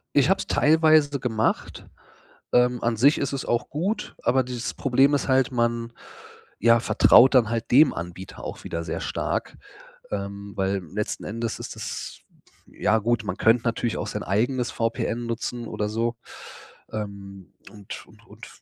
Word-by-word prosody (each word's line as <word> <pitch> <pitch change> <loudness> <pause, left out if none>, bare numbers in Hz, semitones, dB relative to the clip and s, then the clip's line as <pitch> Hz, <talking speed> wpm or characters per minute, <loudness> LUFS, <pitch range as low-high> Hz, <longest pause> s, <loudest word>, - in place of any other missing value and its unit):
Ich 140 -1 +4
habe 190 - +4
es - - -5
teilweise 155 -2 +4
gemacht. 110 -3 -2 0.7
Ähm, 125 0 +3
an 115 -1 0
sich 140 +7 +5
ist 140 - -2
es 135 - -3
auch 120 0 0
gut, 185 +10 -3
aber 130 +1 +2
dieses 125 -1 -5
Problem 135 +1 +3
ist - - -2
halt, 130 -2 +2
man, 120 -1 -1 0.7
ja, 115 +2 +5
vertraut 130 +3 +5
dann 120 -4 +5
halt 115 0 -3
dem 140 +4 +6
Anbieter 90 +3 -8
auch - - -7
wieder 85 0 -4
sehr - - -4
stark. - - -3 0.5
Ähm, 100 0 -5
weil 95 0 -1
letzten 105 0 -3
Endes 115 +1 -4
ist - - -7
es - - -6 0.5
ja, 110 - +1
gut, 115 0 0
man 95 -2 -3
könnte 115 +1 +3
natürlich 115 -1 -1
auch - - -3
sein - - -4
eigenes 120 +6 0
VPN 115 +1 -2
nutzen 115 +1 -4
oder 105 -1 -3
so. 115 +2 -1 0.8
Ähm, 100 -3 -7 0.2
und 105 -3 -10
und - - -21
und - - -13
115 Hz, 160 wpm, -24 LUFS, 105-130 Hz, 0.8 s, dem